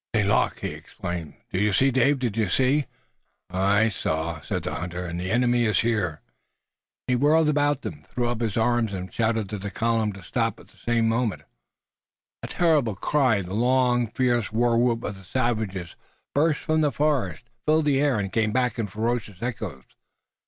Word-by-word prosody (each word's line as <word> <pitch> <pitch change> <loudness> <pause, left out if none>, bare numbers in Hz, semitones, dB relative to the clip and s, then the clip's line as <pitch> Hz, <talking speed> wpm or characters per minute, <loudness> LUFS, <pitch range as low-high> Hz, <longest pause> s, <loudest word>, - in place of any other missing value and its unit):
"St. 105 -3 +2
Luc!" 105 - +2
he - - -2
exclaimed. 85 -4 -6 0.2
"Did 95 - 0
you 105 -1 +2
see, 135 +7 +4
Dave? 135 +3 +3
Did 120 -5 -2
you 110 -4 +1
see?" 135 +8 +2 0.6
"Aye, 100 +3 +3
I 110 - +4
saw," 80 -4 -2
said - - -3
the - - -3
hunter, 90 +1 -4
"and 85 0 -4
the 90 +1 -3
enemy 120 +1 +2
is 105 -4 +3
here!" 105 -10 -1 0.8
He 125 - +1
whirled 150 +5 +4
about, 145 -1 +1 0.2
threw 120 -1 -2
up 120 -1 -2
his 110 -3 -1
arms 115 -2 +1
and 95 -1 -6
shouted 110 -2 0
to 105 - -4
the 100 +1 -4
column 115 0 0
to 95 -1 -11
stop. - - -1
At - - -17
the - - -24
same 115 -1 +1
moment, 115 -2 0 1.0
a - - -5
terrible 150 - +2
cry, 125 -2 +2
the 90 +1 -7
long 125 +1 +2
fierce 120 -1 0
war 120 +1 +2
whoop 120 -1 +2
of 105 - -3
the 95 - -14
savages, 110 -6 -2 0.4
burst 150 +1 +2
from 155 -1 +1
the 150 -2 +2
forest, 135 - 0 0.2
filled 155 0 +3
the 140 -2 +3
air 145 -5 +2
and 100 -2 -3
came 110 -1 +1
back 125 0 0
in 110 - -1
ferocious 110 -1 -2
echoes. 110 - -4
115 Hz, 190 wpm, -25 LUFS, 100-130 Hz, 1.0 s, see